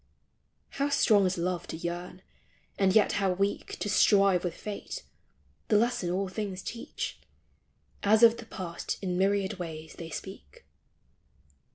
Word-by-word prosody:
How 285 Hz, -, +2 dB
strong 210 Hz, -8 st, +4 dB
is 185 Hz, -, -2 dB
love 175 Hz, 0 st, -2 dB
to -, -, -5 dB
yearn, 175 Hz, +2 st, -5 dB, 0.6 s
and 195 Hz, -1 st, +4 dB
yet 215 Hz, -, +5 dB
how 195 Hz, -2 st, +1 dB
weak 200 Hz, +2 st, -2 dB
To -, -, -3 dB
strive 195 Hz, -3 st, +4 dB
with 175 Hz, -2 st, -2 dB
fate: 210 Hz, -1 st, -6 dB, 0.6 s
the 210 Hz, -, +4 dB
lesson 225 Hz, -5 st, +1 dB
all 190 Hz, +2 st, 0 dB
things 190 Hz, -1 st, -4 dB
teach, 230 Hz, -, -5 dB, 0.8 s
As 215 Hz, +3 st, +4 dB
of 230 Hz, 0 st, +8 dB
the 230 Hz, -, -10 dB
past 175 Hz, -6 st, -5 dB
in 180 Hz, -2 st, -1 dB
myriad 195 Hz, +1 st, +1 dB
ways 160 Hz, -2 st, -6 dB
they 165 Hz, -1 st, -6 dB
speak. 165 Hz, -, -9 dB
190 Hz, 145 wpm, -29 LUFS, 180-205 Hz, 0.8 s, of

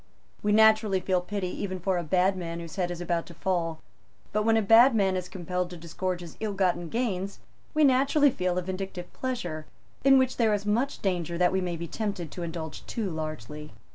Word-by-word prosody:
We 210 Hz, -, +1 dB
naturally 215 Hz, -2 st, +5 dB
feel 185 Hz, 0 st, +1 dB
pity 190 Hz, 0 st, -3 dB
even 185 Hz, -2 st, -3 dB
for 185 Hz, 0 st, 0 dB
a -, -, -3 dB
bad 185 Hz, +4 st, +2 dB
man 170 Hz, -2 st, -5 dB
whose 165 Hz, -2 st, -8 dB
head 180 Hz, -2 st, 0 dB
is 175 Hz, 0 st, -5 dB
about 170 Hz, -1 st, -1 dB
to 170 Hz, -, -12 dB
fall. 165 Hz, -3 st, -1 dB, 0.5 s
But, 215 Hz, -, +2 dB
when 225 Hz, 0 st, +4 dB
a -, -, +3 dB
bad 230 Hz, +5 st, +7 dB
man 195 Hz, -3 st, +2 dB
is 180 Hz, -1 st, -3 dB
compelled 180 Hz, -1 st, -3 dB
to 175 Hz, -, -8 dB
disgorge 175 Hz, +2 st, -3 dB
his 170 Hz, -3 st, -10 dB
ill 215 Hz, -2 st, -2 dB
gotten 180 Hz, -3 st, 0 dB
gains, 200 Hz, -4 st, -2 dB, 0.4 s
we 310 Hz, -, +4 dB
naturally 280 Hz, +1 st, +4 dB
feel 180 Hz, -4 st, -1 dB
a 180 Hz, -, 0 dB
vindictive 185 Hz, -1 st, -5 dB
pleasure, 175 Hz, -12 st, -4 dB, 0.4 s
in 270 Hz, 0 st, +7 dB
which 260 Hz, -1 st, +2 dB
there 220 Hz, -3 st, +3 dB
is 205 Hz, 0 st, -5 dB
much 235 Hz, +7 st, 0 dB
danger 175 Hz, -3 st, -1 dB
that 180 Hz, 0 st, +3 dB
we 190 Hz, 0 st, +1 dB
may 175 Hz, -2 st, -2 dB
be 170 Hz, +1 st, -5 dB
tempted 190 Hz, -6 st, -4 dB
to 180 Hz, -, -7 dB
indulge 165 Hz, -2 st, -5 dB
too 215 Hz, -6 st, -2 dB
largely. 150 Hz, -3 st, -6 dB
185 Hz, 210 wpm, -27 LUFS, 175-210 Hz, 0.5 s, bad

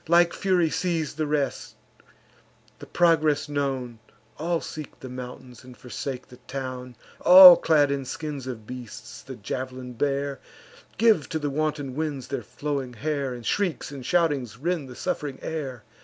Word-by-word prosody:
Like 170 Hz, +1 st, +5 dB
fury 180 Hz, -5 st, +1 dB
seiz'd 165 Hz, -5 st, -1 dB
the 155 Hz, -1 st, -1 dB
rest; 145 Hz, -2 st, -2 dB, 1.0 s
the -, -, -10 dB
progress 155 Hz, -4 st, +3 dB
known, 135 Hz, -5 st, -2 dB, 0.4 s
All 170 Hz, +2 st, 0 dB
seek 155 Hz, -3 st, -8 dB
the 130 Hz, -, -8 dB
mountains, 125 Hz, 0 st, -9 dB
and 125 Hz, -2 st, -13 dB
forsake 125 Hz, +2 st, -6 dB
the 125 Hz, -, -13 dB
town: 130 Hz, -2 st, -6 dB, 0.2 s
All, 180 Hz, -1 st, +11 dB
clad 150 Hz, -4 st, +3 dB
in 140 Hz, -1 st, -2 dB
skins 145 Hz, -1 st, -5 dB
of 115 Hz, -4 st, -6 dB
beasts, 125 Hz, -2 st, -9 dB
the -, -, -9 dB
jav'lin 130 Hz, -1 st, -5 dB
bear, 140 Hz, +2 st, -1 dB, 0.6 s
Give 220 Hz, -9 st, +4 dB
to 160 Hz, -, -1 dB
the 145 Hz, -2 st, -2 dB
wanton 150 Hz, -2 st, -2 dB
winds 145 Hz, -3 st, -3 dB
their 135 Hz, -2 st, -2 dB
flowing 135 Hz, +2 st, -4 dB
hair, 140 Hz, +1 st, -2 dB
And 120 Hz, -2 st, -10 dB
shrieks 180 Hz, -, -1 dB
and 140 Hz, -3 st, -8 dB
shoutings 145 Hz, -9 st, +1 dB
rend 160 Hz, -1 st, -2 dB
the 125 Hz, -, -10 dB
suff'ring 140 Hz, +1 st, -3 dB
air. 135 Hz, -8 st, -5 dB
140 Hz, 155 wpm, -25 LUFS, 130-155 Hz, 1.0 s, All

